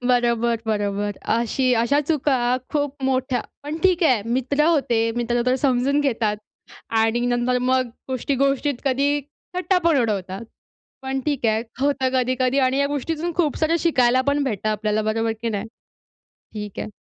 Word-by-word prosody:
बरोबर, 235 -2 +2
बरोबर. 205 -1 -1 0.2
अशी 245 +3 +1
अशा 285 +5 +2
चुका 295 -3 +1 0.3
खूप 290 -2 -1
मोठ्या 260 -1 0 0.2
पण 295 +2 -4
ठीक 370 -2 +3
आहे 255 -10 +3
मित्र 265 +4 +1
होते, 280 -8 +2 0.2
मित्र 240 0 0
तर 255 - +3
समजून 265 +1 +1
घेतात 225 -7 0 0.6
आणि 225 +2 +2
नंतर 245 +1 +1
मग 255 0 +1 0.2
गोष्टी-गोष्टीत 275 +2 0
कधी 275 +1 +2 0.5
थट्टा 365 0 +2
पण 325 - +3
उडवतात. 200 -2 -2 0.6
पण 265 0 -2
ठीक 270 -3 -1
आहे, 220 0 +2 0.2
होतं 275 -1 +1
कधी-कधी 255 +1 +1
आणि 260 0 +2
या 280 - +3
गोष्टीतून 315 +4 -2
खूपसारं 320 0 +1
शिकायला 255 -7 +3
पण 285 +1 +2
भेटतं 215 -5 -2
आपल्याला 215 0 0
बरोबर 225 +1 0
की 235 - 0
नाही? 205 0 -3 0.9
ठीक 210 -2 -6
आहे. - - -4
255 Hz, 150 wpm, -22 LUFS, 230-280 Hz, 0.9 s, ठीक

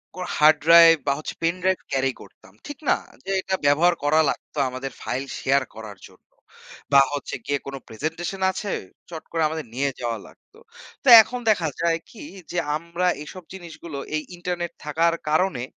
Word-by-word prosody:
Core 185 - -5
hard 155 +1 +6
drive 165 0 +8
বা 140 - +3
হচ্ছে 155 - -6
pen 165 +1 +1
drive 190 0 +1
carry 135 0 +1
করতাম। 95 - -17
ঠিক 290 - -7
না? - - +4 0.3
যে 195 - -3
এটা 190 0 -1
ব্যবহার 155 +5 +4
করা 150 +2 +3
লাগতো - - -6
আমাদের 130 +1 -6
ফাইল 135 +2 -3
শেয়ার 140 +1 +2
করার 110 -2 -9
জন্য। - - -23 0.7
বা 140 - +9
হচ্ছে 145 - -4
গিয়ে 140 0 -1
কোন 140 - -5
প্রেজেন্টেশন 165 - -5
আছে 200 +1 -5 0.4
চট 160 -2 -7
করে 165 - -1
আমাদের 160 -1 -5
নিয়ে 140 +2 0
যাওয়া 115 -2 -2
লাগতো। 435 - -21 0.4
তো 270 - +3
এখন 250 +3 -6
দেখা 175 -6 0
যায় 165 -1 +1
কি? 230 - -11 0.3
যে 175 - -1 0.2
আমরা 170 +3 -2
এইসব 180 +4 -9
জিনিসগুলো 165 -5 -9 0.2
এই 155 - 0 0.2
ইন্টারনেট 175 -1 -3
থাকার 165 +3 +1 0.2
কারণে 155 -5 +1
160 Hz, 175 wpm, -23 LUFS, 140-175 Hz, 0.7 s, বা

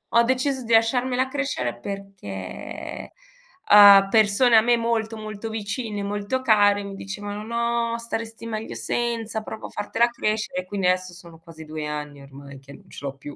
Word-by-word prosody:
Ho 235 - +7
deciso 260 +1 0
di 230 0 -1
lasciarmela 250 +3 +2
crescere 130 - -3
perché, 195 - -7 0.6
uhm, 200 -1 +9
persone 220 +2 +4
a - - +7
me 240 +1 +3
molto, 230 -1 -1
molto 215 +1 -6
vicine, 210 -1 -4
molto 205 +5 -2
care 205 -3 +4
mi 200 0 -7
dicevano: 205 +2 -6
"No, 235 0 -1
staresti 230 -1 -6
meglio 220 0 -5
senza, 230 -2 -2
provo 220 - -8
a - - -14
fartela 230 +3 0
crescere", 215 -5 -2
e 185 - -16
quindi 195 0 -3
adesso 185 0 0
sono 170 -2 -14
quasi 160 -1 -13
2 155 -1 -5
anni 150 -1 -6
ormai 140 0 -12
che 140 +1 -14
non - - -16
ce - - -9
l'ho 135 -1 -4
più. 145 +1 -10
210 Hz, 170 wpm, -24 LUFS, 185-230 Hz, 0.6 s, uhm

